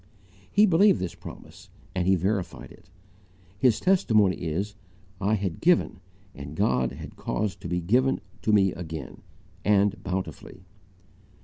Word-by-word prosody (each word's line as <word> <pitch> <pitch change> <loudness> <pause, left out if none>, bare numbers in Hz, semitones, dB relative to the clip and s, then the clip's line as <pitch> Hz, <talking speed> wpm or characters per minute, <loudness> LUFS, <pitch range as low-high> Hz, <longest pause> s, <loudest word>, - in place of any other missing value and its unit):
He 205 +2 +5
believed 195 +1 +4
this 90 - -3
promise - - -12 0.2
and 90 -1 -1
he 95 - +5
verified 95 -1 -2
it. - - -18 0.7
His 125 -3 +3
testimony 110 - +3
is: 90 +5 -3 0.5
"I 100 +2 +1
had 95 -5 -3
GIVEN, 175 - +2 0.3
and 70 +2 -9
God 65 -2 +1
had 75 +3 -9
caused 105 -2 -3
to - - -6
be 90 +1 -1
GIVEN 125 +10 +2 0.2
TO 110 - +1
ME 100 -3 +4
AGAIN, 80 -5 -7 0.4
and 100 -1 +2
bountifully." 90 0 -5
95 Hz, 135 wpm, -26 LUFS, 85-110 Hz, 0.7 s, He